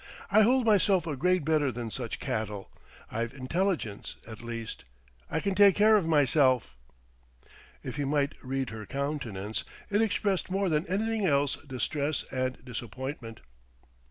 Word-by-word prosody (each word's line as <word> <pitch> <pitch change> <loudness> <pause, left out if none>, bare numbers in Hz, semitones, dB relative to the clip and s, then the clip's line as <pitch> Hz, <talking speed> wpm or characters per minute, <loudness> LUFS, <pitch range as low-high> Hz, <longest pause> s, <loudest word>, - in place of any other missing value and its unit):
I 215 +2 +7
hold 250 +3 +4
myself 200 -4 +4
a 155 -3 -2
grade 180 +2 +2
better 150 -3 +2
than 120 -1 -5
such 120 -1 -4
cattle; 105 -2 -3 0.4
I've 115 +3 -3
intelligence, 140 - -2
at 110 -1 -9
least.... 115 -1 -6 0.5
I 160 - 0
can 200 +3 -1
take 200 -1 +6
care 215 +1 +6
of 195 -6 +2
myself!" 135 - +3 1.1
If - - -5
he 145 - 0
might 140 0 +1
read 130 -1 -2
her 110 -2 -7
countenance, 130 -8 -3 0.3
it 205 +2 +3
expressed 200 -4 0
more 195 0 +1
than 155 0 +1
anything 215 +2 0
else 140 -2 +2
distress 140 +4 -1
and 130 -1 -2
disappointment. 120 0 -6
140 Hz, 145 wpm, -29 LUFS, 120-185 Hz, 1.1 s, I